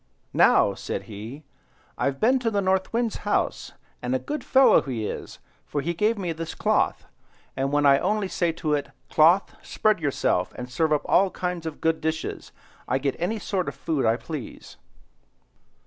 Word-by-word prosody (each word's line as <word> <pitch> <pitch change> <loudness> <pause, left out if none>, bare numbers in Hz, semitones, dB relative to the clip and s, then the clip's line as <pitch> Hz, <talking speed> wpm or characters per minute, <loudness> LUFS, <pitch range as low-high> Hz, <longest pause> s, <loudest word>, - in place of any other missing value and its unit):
"Now," - - +5
said - - -5
he, 110 +8 -9 0.5
"I've 135 -1 -1
been 255 +4 +3
to 240 -2 0
the 205 -2 0
North 190 -1 +1
Wind's 230 -1 0
house, 205 - -1 0.3
and 125 +1 -1
a - - +3
good 290 - -5
fellow 265 +1 +5
he 120 -6 -4
is, - - -6 0.3
for 145 - -3
he 170 +5 -2
gave 210 +6 +1
me 180 -4 -2
this 165 0 -6
cloth, - - +1 0.5
and 135 +1 -1
when 145 0 +2
I 140 -1 +6
only 205 +1 0
say 175 -2 0
to 155 -1 -2
it, 145 -1 -1 0.2
'Cloth, 170 +5 +4
spread 215 -3 +1
yourself, 135 - 0
and 125 0 -7
serve 160 +3 +1
up 150 - +2
all 195 0 +4
kinds 180 -3 -4
of 155 - -7
good 160 0 +1
dishes,' 160 +1 -3 0.4
I 130 - +1
get 135 0 -1
any 180 +7 -1
sort 195 -3 -2
of - - -4
food 155 -4 -1
I 110 - +4
please." 150 -3 -8
160 Hz, 180 wpm, -25 LUFS, 140-195 Hz, 0.5 s, I